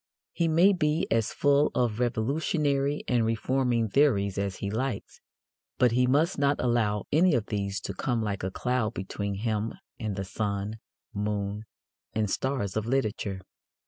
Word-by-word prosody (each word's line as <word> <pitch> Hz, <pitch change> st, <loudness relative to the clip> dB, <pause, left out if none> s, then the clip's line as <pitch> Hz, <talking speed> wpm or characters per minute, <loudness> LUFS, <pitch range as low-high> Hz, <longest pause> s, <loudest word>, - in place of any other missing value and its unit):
He 170 Hz, -, 0 dB
may 170 Hz, +5 st, +5 dB
be 155 Hz, -3 st, +1 dB
as 115 Hz, -2 st, +2 dB
full 145 Hz, +1 st, +3 dB
of 120 Hz, -3 st, +1 dB
revolutionary 140 Hz, +4 st, 0 dB
and 120 Hz, -2 st, +2 dB
reforming 115 Hz, +1 st, +1 dB
theories 100 Hz, -6 st, +2 dB
as 100 Hz, -2 st, -2 dB
he 100 Hz, +1 st, -4 dB
likes, 130 Hz, +4 st, -3 dB, 0.6 s
but 125 Hz, -2 st, +4 dB
he 125 Hz, +1 st, +3 dB
must 150 Hz, +7 st, +2 dB
not 140 Hz, 0 st, +2 dB
allow 110 Hz, -5 st, +1 dB
any 165 Hz, +1 st, +4 dB
of 115 Hz, -3 st, 0 dB
these 100 Hz, -1 st, -2 dB
to 100 Hz, -, -4 dB
come 115 Hz, +4 st, -1 dB
like 100 Hz, -2 st, -2 dB
a 95 Hz, -, -2 dB
cloud 125 Hz, +1 st, -1 dB
between 100 Hz, +2 st, -3 dB
him 110 Hz, +1 st, -1 dB, 0.3 s
and 110 Hz, -4 st, -3 dB
the 95 Hz, 0 st, -3 dB
sun, 100 Hz, +2 st, -3 dB, 0.3 s
moon 105 Hz, 0 st, -2 dB, 0.5 s
and 105 Hz, -2 st, 0 dB
stars 130 Hz, -8 st, -1 dB
of 110 Hz, 0 st, -1 dB
literature. 105 Hz, -6 st, -1 dB
115 Hz, 155 wpm, -28 LUFS, 105-135 Hz, 0.6 s, may